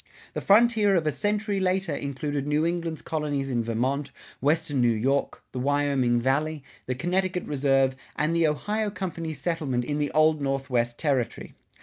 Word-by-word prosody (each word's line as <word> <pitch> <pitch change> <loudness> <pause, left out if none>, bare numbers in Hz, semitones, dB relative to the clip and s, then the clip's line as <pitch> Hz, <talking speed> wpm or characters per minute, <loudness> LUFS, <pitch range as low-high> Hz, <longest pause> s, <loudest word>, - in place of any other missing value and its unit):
The - - -3
frontier 215 -1 +4
of 165 -3 +1
a 155 - +2
century 205 +2 -1
later 185 -3 0
included 140 0 -3
New 150 +2 +2
England's 170 -2 -2
colonies 145 -3 -2
in 120 -2 0
Vermont, 130 +5 -1 0.3
Western 145 -1 +1
New 120 - +4
York, 130 +5 0
the 130 - -4
Wyoming 140 -3 +2
Valley, 145 +4 0 0.2
the 130 - -1
Connecticut 180 +4 -1
Reserve, 135 -2 +2 0.2
and 155 +3 0
the 165 -1 +4
Ohio 210 +8 -1
Company's 165 -6 -5
settlement 140 -6 -1
in 145 +2 -2
the 145 - 0
Old 155 -1 +4
Northwest 135 -4 -1
Territory. 135 -6 -1
150 Hz, 155 wpm, -26 LUFS, 135-170 Hz, 0.3 s, frontier